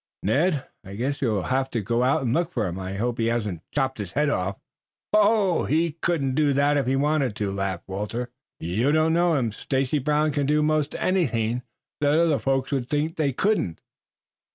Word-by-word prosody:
"Ned, 145 - +1 0.2
I 95 0 -9
guess 135 +6 -2
you 135 - +2
will 105 -4 0
have 130 +3 0
to 115 - -2
go 115 +4 0 0.2
look 160 +8 0
for 115 -4 0
him. 90 +1 -4
I 95 +1 -5
hope 120 +4 -2
he 115 - +1
hasn't 105 -8 -1
chopped 130 -4 -1
his 100 -3 -5
head 145 0 +2
off." 95 -3 -2 0.5
"Oh, 210 -4 +3
he 165 +2 +1
couldn't 155 -4 -1
do 145 0 +2
that 140 +2 +3
if 140 -3 0
he 130 - +2
wanted 140 -4 +1
to," 105 -3 -2
laughed 95 -2 -3
Walter. 105 +6 -4 0.3
"You 105 - 0
don't 155 +1 +3
know 170 -1 +3
him. 120 -5 0
Stacy 135 +6 -1
Brown 150 +2 +1
can 145 -1 -1
do 150 +1 +3
most 155 -1 0
anything 125 -10 0 0.4
that 145 +1 +3
other 165 -4 +3
folks 135 0 0
would 130 -3 -1
think 150 +3 -1
they 150 -3 +1
couldn't. 160 - 0
135 Hz, 195 wpm, -25 LUFS, 115-150 Hz, 0.5 s, Oh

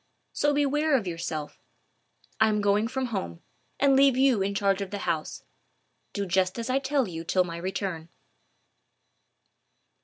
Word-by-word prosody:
So 290 - +2
beware 290 +1 +2
of 225 - -4
yourself. 165 -3 -5 0.8
I 220 0 +5
am 210 -1 +1
going 205 +2 +2
from 260 +2 -2
home, 85 - -4 0.4
and 275 -1 +4
leave 270 -1 +5
you 260 -6 +3
in 200 +1 -1
charge 200 -1 +1
of 195 - -4
the 205 - -4
house. 155 -2 -3 0.7
Do 200 -1 -3
just 185 0 +1
as 235 +2 -3
I 265 - +2
tell 275 -2 0
you 165 -2 -6
till 180 +2 +2
my 170 -1 -6
return." 175 -2 -4
200 Hz, 155 wpm, -27 LUFS, 180-265 Hz, 0.8 s, I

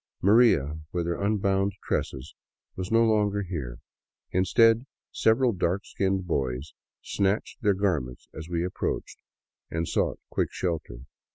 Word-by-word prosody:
" - - -55
Maria 100 - +4
" 80 - -41
with 85 -2 -1
her 85 +2 -2
unbound 100 -1 +1
tresses, 65 +2 -3 0.4
was 95 +2 -5
no 115 0 +5
longer 105 -2 +2
here; 75 -10 -5 0.5
instead, 115 +6 +4 0.2
several 120 +3 +3
dark 95 +1 -1
skinned 95 -1 -1
boys 65 -4 -2 0.3
snatched 100 +2 -1
their 105 -2 +3
garments 80 -11 -1
as 80 +2 -8
we 85 0 0
approached 90 - -3 0.5
and 80 0 -2
sought - - 0
quick - - 0
shelter. 80 -9 -3
95 Hz, 135 wpm, -27 LUFS, 80-105 Hz, 0.5 s, no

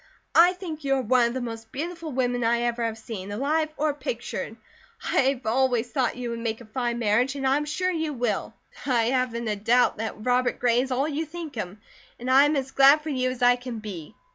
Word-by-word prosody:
I 350 +2 +7
think 335 -5 -7
you 275 -1 +2
are 265 - 0
one 245 +1 +4
of 235 - -5
the 260 - -2
most 225 -2 -7
beautiful 330 +2 -5
women 245 -2 0
I 235 +1 +2
ever 240 0 -1
have 225 -1 -2
seen, 205 -3 -7
alive 300 +8 0
or 305 0 +1
pictured. 465 - -5 0.5
I - - +1 0.2
have 255 - -16
always 245 0 +1
thought 260 -4 0
you 245 -1 -4
would 235 - -4
make 225 -1 -3
a 235 - -12
fine 240 +1 -2
marriage, 235 +4 +1
and 275 -1 -3
I 265 +1 +4
am 295 - -2
sure 365 +5 -1
you 320 -3 -2
will. 245 -3 -2 0.3
I 235 -3 +2
haven't 245 -3 -1
a 210 - 0
doubt 230 +5 +2
that 220 0 -5
Robert 250 0 +2
Gray 245 0 +3
is 265 - -4
all 265 +3 0
you 310 +1 -2
think 325 -1 -7
him, 205 -2 -6 0.4
and 250 +2 -2
I 270 +2 +7
am 295 +1 +1
as 270 -1 -2
glad 275 +3 +6
for 310 - -6
you 255 -3 0
as 255 -1 -4
I 245 0 +6
can 245 -2 -6
be. 195 -8 -8
250 Hz, 235 wpm, -25 LUFS, 235-280 Hz, 0.5 s, I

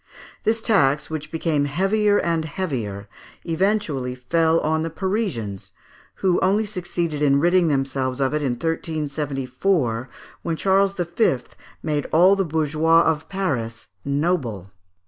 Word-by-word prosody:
This 225 +1 +1
tax, 150 - +2
which 155 -1 -5
became 160 -3 0
heavier 205 +7 +2
and 165 -3 0
heavier, 125 - -4 0.4
eventually 165 -8 0
fell 160 +6 +2
on 160 +1 0
the 165 - -2
Parisians, 165 - -3 0.4
who 185 -2 +1
only 200 +4 +2
succeeded 175 -6 -3
in 140 -1 +4
ridding 175 +2 +3
themselves 135 -2 -1
of 135 +1 +1
it 150 - 0
in 135 -4 0
1374, 145 -3 -1 0.3
when 165 - -2
Charles 195 +3 +2
V. 175 - +1 0.5
made 150 -2 -1
all 180 +5 +6
the 195 - +1
bourgeois 160 0 +2
of 160 -1 -1
Paris 130 - -3
noble. 140 - -1
160 Hz, 125 wpm, -22 LUFS, 135-185 Hz, 0.5 s, all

